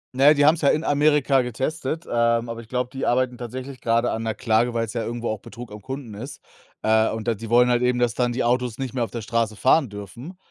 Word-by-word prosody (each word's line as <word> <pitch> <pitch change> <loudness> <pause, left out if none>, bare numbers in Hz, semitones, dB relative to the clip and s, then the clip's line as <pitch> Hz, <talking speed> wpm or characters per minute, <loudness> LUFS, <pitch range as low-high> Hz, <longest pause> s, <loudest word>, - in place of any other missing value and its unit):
Na 135 +2 +3
ja, 150 - +9
die 145 0 +3
haben's 160 +2 +5
ja 140 - +2
in 155 - +1
Amerika 145 -2 +3
getestet, 135 +6 -3
ähm, 115 0 +1
aber 115 0 -5
ich 115 - -11
glaube, 125 0 -2
die 135 - -4
arbeiten 125 0 +1
tatsächlich 130 +2 -7
grade 115 +1 +1
an 115 0 -3
'ner 110 -1 -1
Klage, 115 +2 +1
weil's 115 -2 -2
ja 115 -2 -3
irgendwo 120 +1 -4
auch 110 -2 -3
Betrug 120 -2 -11
am 105 0 -9
Kunden 130 -2 -7
ist. 130 +7 -8 0.4
Äh, 110 0 +3
und 110 +1 -3
da - - +2
die 110 +1 -8
wollen 125 +1 +5
halt 120 0 +2
eben, 125 0 +2
dass 120 -2 +1
dann 120 -1 0
die 125 - -1
Autos 125 -1 0
nicht 130 -2 -4
mehr 120 -3 0
auf - - -13
der 115 - -5
Straße 115 -1 -1
fahren 135 +5 +3
dürfen, 110 - -9
120 Hz, 255 wpm, -23 LUFS, 115-130 Hz, 0.4 s, ja